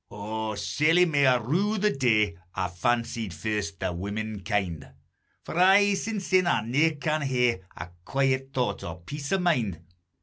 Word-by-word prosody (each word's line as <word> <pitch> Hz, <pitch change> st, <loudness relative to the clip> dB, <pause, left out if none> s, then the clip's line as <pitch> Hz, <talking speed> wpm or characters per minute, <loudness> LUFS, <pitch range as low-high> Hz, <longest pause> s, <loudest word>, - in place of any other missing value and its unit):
O, 110 Hz, +1 st, -4 dB
sairly 165 Hz, -, +3 dB
may 145 Hz, -5 st, +3 dB
I 130 Hz, -, +5 dB
rue 175 Hz, -, 0 dB
the 210 Hz, +1 st, +2 dB
day 110 Hz, -9 st, +2 dB, 0.2 s
I 95 Hz, 0 st, -1 dB
fancied 115 Hz, +1 st, -1 dB
first 100 Hz, +2 st, -3 dB
the 95 Hz, -1 st, -2 dB
womenkind; 100 Hz, -4 st, -3 dB, 0.5 s
For -, -, -7 dB
aye 200 Hz, +2 st, +6 dB
sinsyne 195 Hz, -3 st, 0 dB
I 110 Hz, -10 st, +1 dB
ne'er 150 Hz, +7 st, +2 dB
can 155 Hz, +1 st, -1 dB
hae 125 Hz, -7 st, +1 dB, 0.2 s
Ae -, -, -6 dB, 0.2 s
quiet 135 Hz, +1 st, 0 dB
thought 125 Hz, -7 st, -2 dB
or 85 Hz, +1 st, -7 dB
peace 145 Hz, -, -6 dB
o' 195 Hz, -, +3 dB
mind! 125 Hz, -, 0 dB
125 Hz, 155 wpm, -26 LUFS, 105-155 Hz, 0.5 s, aye